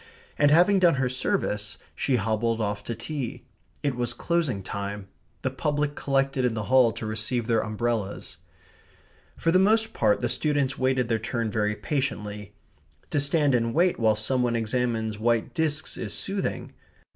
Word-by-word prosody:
And 145 - +5
having 180 +6 +5
done 175 -4 +5
her 135 -2 0
service, 110 - -2 0.2
she 135 - +1
hobbled 115 +1 0
off 105 -1 -2
to 115 - -3
tea. 130 +2 -5 0.4
It 140 -2 +1
was 120 0 -2
closing 150 - 0
time. 100 +1 -5 0.3
The - - 0
public 145 0 -1
collected 135 -2 0
in 120 -2 +1
the 110 - -2
hall 125 -3 +6
to - - -6
receive 110 +2 -2
their 115 -1 +2
umbrellas. 110 -2 -3 1.0
For 165 - +1
the 185 - +5
most 220 +3 +3
part 105 -2 +2
the 120 - 0
students 140 +1 0
wait 130 -2 +1
their 115 -1 +1
turn 115 -1 -2
very 105 -1 0
patiently. 105 -4 -3 0.6
To - - +2
stand 145 0 +2
and 115 -1 +1
wait 175 -1 +3
while 110 -2 +3
some 125 +4 0
one 120 -1 +1
examines 115 -1 -1
white 115 +1 +1
discs 155 +1 -1
is - - -4
soothing. 195 0 -3
120 Hz, 165 wpm, -26 LUFS, 110-145 Hz, 1.0 s, hall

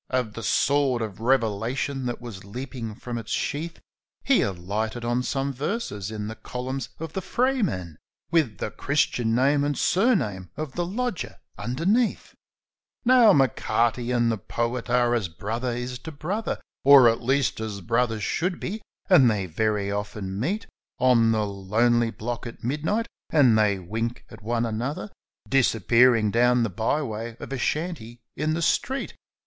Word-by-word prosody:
V 130 -1 +2
the 115 - -7
sword 130 +2 +2
of 105 -3 -6
revelation 125 +2 0
that 120 - -3
was 115 -6 -9
leapin' 115 +1 -6
from 120 0 -5
its 110 - -9
sheath,' 165 +4 -2 0.4
He 275 - +4
alighted 105 +6 -2
on 120 +1 +1
some 135 +2 -2
verses 135 - -3
in 105 -1 -5
the 110 - -4
columns 125 +4 -5
of 160 -1 -6
the 190 - -2
FRAYMAN, 185 - -1 0.3
1 165 - +6
Wid 115 -9 -8
the - - -4
Christian 125 -5 0
name 140 +3 +3
an 145 0 0
surname 155 - +1
av 155 -2 -4
the 175 +4 -2
lodger 235 0 -3 0.2
ondemeath 180 - 0 0.4
/' - - -55
Now, 245 -3 +7
M'Carty 120 - +1
and 120 -2 +2
the 110 - -2
poet 120 +5 -3
are 120 -1 +3
as 115 -6 0
brother 110 +9 -4
is 125 +1 -4
to 160 - -8
brother, 180 +9 -3 0.2
Or, 140 -3 +9
at 115 0 +2
least, 130 0 +1
as 110 -2 -4
brothers 115 0 0
should 180 +2 -1
be; 215 +4 -4 0.3
and 150 -10 +6
they 105 -4 0
very 100 +3 -1
often 100 -1 -4
meet 190 - -1 0.3
On 120 -3 +4
the 110 -1 +1
lonely 110 +4 +1
block 120 +2 -5
at 115 - -11
midnight, 155 - 0 0.2
and 135 -8 +5
they 105 -2 +3
wink 110 +6 -4
at - - -12
one 115 +2 0
another 115 0 -3 0.4
Disappearing 115 -3 +4
down 125 +1 +4
the 115 - -1
by 115 - 0
way 115 -1 -5
of - - -7
a 135 - -3
shanty 135 -6 -3 0.2
in 155 +1 0
the 170 - -1
street. 265 - 0
120 Hz, 165 wpm, -25 LUFS, 110-145 Hz, 0.4 s, Or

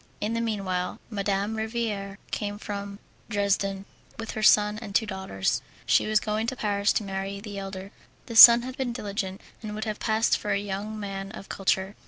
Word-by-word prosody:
In 215 +2 -2
the 230 - 0
meanwhile 195 -5 -2
Madame 200 +1 -1
Riviere 220 -3 -3
came 205 -1 -3
from 200 -1 -6 0.3
Dresden 200 -2 0 0.3
with 225 -1 -5
her 220 - -4
son 210 0 +5
and 205 -4 -8
two 225 - +3
daughters. 190 - -2 0.2
She - - +3
was 215 0 +3
going 215 +1 -2
to 260 - -2
Paris 205 -3 +1
to - - 0
marry 195 0 -4
the 205 -1 -7
elder. 195 0 -7 0.3
The 230 - -7
son 235 +1 +11
had 255 0 -6
been 260 -3 -2
diligent, 200 -4 -4 0.2
and 210 -2 -6
would 215 - -4
have 215 -1 -4
passed 220 0 +2
for 210 - -1
a - - +2
young 205 +2 -5
man 195 -1 -5
of 195 - -10
culture. 190 +1 0
205 Hz, 190 wpm, -26 LUFS, 195-220 Hz, 0.3 s, son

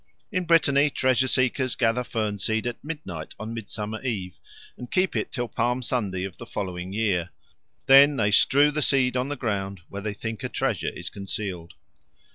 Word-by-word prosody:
In 185 -1 -1
Brittany 150 -4 +4
treasure 130 -1 +2
seekers 130 0 +1
gather 120 0 +1
fern 110 -4 -2
seed 110 +3 0
at 120 -1 -4
midnight 140 - -6
on 110 +2 -5
Midsummer 110 -1 -5
Eve, 100 -9 -4 0.4
and 125 - -9
keep 185 0 +1
it - - -1
till 120 -2 -2
Palm 120 +3 -1
Sunday 100 -7 -1
of 95 -2 -7
the 115 - -9
following 90 -3 -4
year; 100 -5 0 0.6
then 140 +2 +8
they 105 -2 +2
strew 145 +7 +5
the 150 +1 -2
seed 130 -2 +3
on 125 +1 0
the 145 - -3
ground 100 -7 -3
where 100 - -6
they 105 0 -4
think 110 -1 -5
a - - -2
treasure - - -1
is - - -6
concealed. 95 -3 -5
115 Hz, 180 wpm, -25 LUFS, 100-130 Hz, 0.6 s, then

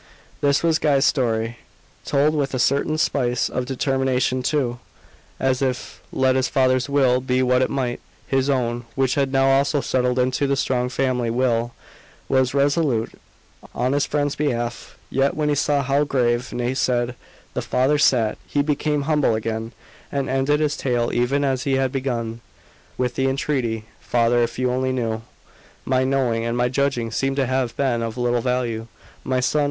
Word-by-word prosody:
This 140 +1 +2
was 165 -2 +3
Guy's 140 -3 +3
story, 115 -3 0 0.5
told 145 +2 +2
with 140 -3 -1
a - - 0
certain 140 +5 +1
spice 125 -6 +1
of 125 0 -3
determination 130 -1 0
too, 125 -3 -1 0.6
as 130 -1 +1
if 130 -2 -3
let 130 0 +2
his 130 -1 +2
father's 130 0 +2
will 130 -3 +3
be 130 0 +1
what 125 0 +3
it 130 - +1
might, 125 -3 -2 0.3
his 135 +1 +1
own, 120 -3 0
which 135 -2 +1
had 140 -2 0
now 135 0 +3
also 140 +2 +3
settled 125 -2 0
into 130 +3 +1
the 140 - +1
strong 125 -2 0
"family" 125 -2 0
will, 120 -1 0 0.5
was 130 0 +1
resolute 140 -4 +1 0.6
on 125 +3 0
his 145 - +1
friend's 145 -1 0
behalf. 120 -5 -3
Yet 135 +1 +1
when 150 -1 0
he - - +3
saw 145 0 +1
how 140 +2 +2
grave, 125 -3 0
nay 120 +1 -1
sad, 125 -2 0 0.4
the - - -2
father 135 +4 +1
sat, 115 -7 +3
he 145 - +1
became 150 0 0
humble 150 -6 +2
again, 110 +1 -3 0.4
and 140 -1 -1
ended 135 +3 +1
his 150 -1 +1
tale 120 -4 0
even 130 +4 +1
as 135 -2 0
he 135 +1 -1
had 135 -1 +1
begun, 120 -4 -3 0.6
with 125 -1 -1
the 135 +2 0
entreaty 130 -5 -1
"Father, 120 0 +2
if 115 -1 -1
you 125 0 +1
only 130 +1 0
knew 115 -3 -2 0.3
" - - -28
"My 130 0 +2
knowing 130 -4 +1
and 115 +1 -2
my 125 0 +2
judging 130 -3 0
seem 135 +3 -1
to 135 -1 +1
have 130 -1 -1
been 130 -4 +1
of 115 0 -4
little 120 -1 +1
value, 120 -2 -1 0.4
my 130 -1 0
son. 140 +4 +1
130 Hz, 175 wpm, -22 LUFS, 120-140 Hz, 0.6 s, was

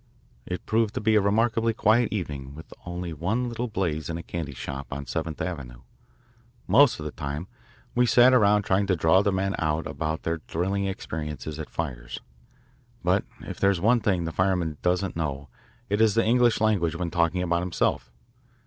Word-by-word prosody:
It 90 - -5
proved 110 -1 +1
to - - 0
be 110 +1 +2
a 105 - +5
remarkably 115 +2 +1
quiet 110 +3 +3
evening 70 -9 -4
with 80 +1 -11
only 90 -1 -4
one 100 - -1
little 120 +1 -3
blaze 85 -8 -2
in 85 - -3
a 85 - -7
candy 80 -6 -5
shop 70 +2 -6
on 70 0 -5
Seventh 80 +4 -4
Avenue. 70 -9 -5 0.8
Most 125 - +5
of 75 - -6
the 75 - -4
time 75 +4 -5 0.5
we 125 0 +3
sat 125 +3 +6
around 105 -4 +4
trying 95 +1 +1
to 95 - +2
draw 80 +3 +4
the 100 0 +1
men 95 +1 0
out 80 0 0
about 80 -1 -3
their 80 0 -1
thrilling 95 +4 -1
experiences 75 -5 -5
at 80 - -6
fires. 60 -7 -5 0.8
But - - +2 0.2
if - - -8
there 100 - +4
is 95 -3 +1
one 115 +6 +4
thing 95 -6 0
the 80 - -3
fireman 90 -4 0
doesn't 90 +2 0
know 70 -4 -3 0.4
it 105 +1 0
is 110 -2 +4
the 115 - +3
English 120 0 +3
language 100 -7 +1
when 85 0 -3
talking 85 +1 +1
about 85 -1 +1
himself. 75 -8 -1
90 Hz, 185 wpm, -26 LUFS, 80-105 Hz, 0.8 s, sat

